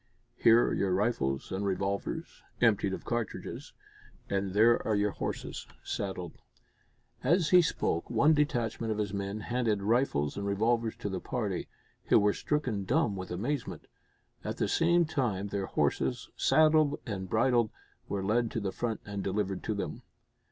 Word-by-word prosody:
Here 115 +1 +5
are - - 0
your 95 -2 +1
rifles, 70 - 0
and 95 +2 -2
revolvers, 100 0 -2 0.2
emptied 105 -4 +3
of - - -5
cartridges, 120 -3 -4 0.6
and 95 -1 -1
there 115 +3 +5
are 110 - +1
your 105 0 +1
horses - - -5 0.2
saddled." 95 -4 -4 0.8
As 170 -2 +3
he 180 -1 +8
spoke, 85 - -1
one 140 +7 +4
detachment 120 -6 0
of 105 - -1
his 105 -2 -2
men 100 +1 -3
handed 115 -3 0
rifles 105 - +1
and 100 0 -3
revolvers 115 +3 +1
to 105 - -4
the 95 -1 -3
party, 100 -1 -3 0.4
who - - +5
were 105 0 +4
stricken 125 -9 -1
dumb 120 - +1
with 95 -1 -6
amazement. 120 +9 -3 0.6
At - - -4
the - - +1
same 170 +1 +3
time, 115 -10 -1
their 100 -1 -2
horses, - - -1
saddled 155 -2 +4
and 95 -6 -4
bridled, 120 +1 +3 0.4
were 100 -1 -2
led 115 +4 +1
to - - -2
the 100 -3 -2
front 115 +1 -3
and 100 -2 -4
delivered 95 -1 -1
to - - -1
them. - - -4
105 Hz, 160 wpm, -30 LUFS, 100-120 Hz, 0.8 s, he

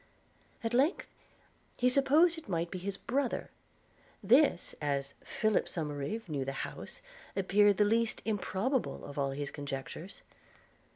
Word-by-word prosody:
At 225 +1 -1
length, 275 +8 +3 0.7
he 250 - +3
supposed 285 +7 +5
it 325 -9 -11
might 170 -1 -1
be 185 - -4
his 195 +2 -3
brother. 260 +3 -1 0.7
This, 265 - +4
as 140 -1 -1
Philip 215 -1 +1
Somerive 150 +7 -3
knew 145 -4 -2
the 135 +1 -3
house, - - -8 0.3
appeared 200 +1 +4
the 210 - +5
least 230 +2 +1
improbable 220 +4 -1
of 145 0 -6
all 140 -1 +1
his 140 +1 -3
conjectures. 145 +5 -6
200 Hz, 130 wpm, -32 LUFS, 145-245 Hz, 0.7 s, supposed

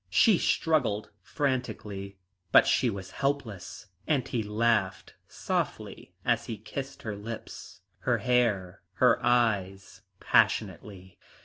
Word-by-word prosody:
She 195 - +5
struggled 120 -10 +1
frantically, 105 -8 -3 0.3
but - - +7
she 125 - +2
was 95 -3 -6
helpless, 120 -12 -3 0.2
and 140 -5 +1
he 120 - -1
laughed 105 -2 0
softly - - -4
as - - +1
he 115 - -4
kissed 135 +6 -7
her 110 -2 -4
lips, 105 -3 -9 0.2
her 120 -2 +1
hair, 110 -6 0
her - - +3
eyes 100 -6 0 0.2
passionately. 95 -3 0
110 Hz, 110 wpm, -28 LUFS, 100-125 Hz, 0.3 s, but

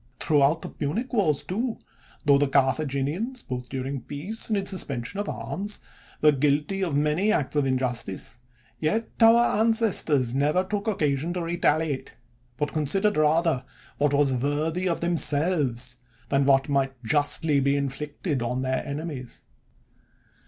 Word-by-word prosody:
Throughout 150 +1 +3
the - - -5
Punic 220 - -3
Wars, 160 - +1
too, 225 +5 -2 0.5
tho 140 -1 +5
the 145 - +2
Carthaginians, 140 - 0
both 125 -1 -6
during 135 0 -4
peace 165 - -5
and 215 - 0
in 195 - -2
suspensions 180 - -3
of 205 - -5
arms, 205 +2 -4 0.4
were 150 - +7
guilty 150 +7 +1
of 165 -6 -1
many 150 +8 +2
acts 145 -5 0
of 145 -2 +2
injustice, 125 -4 -3 0.4
yet 220 +9 0
our 230 -1 +5
ancestors 200 - +2
never 150 +7 +2
took 205 +2 -3
occasion 155 -5 0
to 180 - -3
retaliate, 160 -4 0 0.4
but 145 +2 -2
considered 190 +8 +2
rather 155 -2 +2 0.4
what 145 -1 +2
was 140 -2 +3
worthy 155 +7 -1
of 170 - -2
themselves, 145 -7 +1 0.3
than 140 0 +2
what 135 -1 +4
might 135 -3 -1
just 145 +7 +1
ly 150 -3 +3
be 140 +1 +2
inflicted 145 +1 -3
on 125 +2 -2
their 130 0 -1
enemies. 140 -3 -6
150 Hz, 145 wpm, -25 LUFS, 135-180 Hz, 0.5 s, were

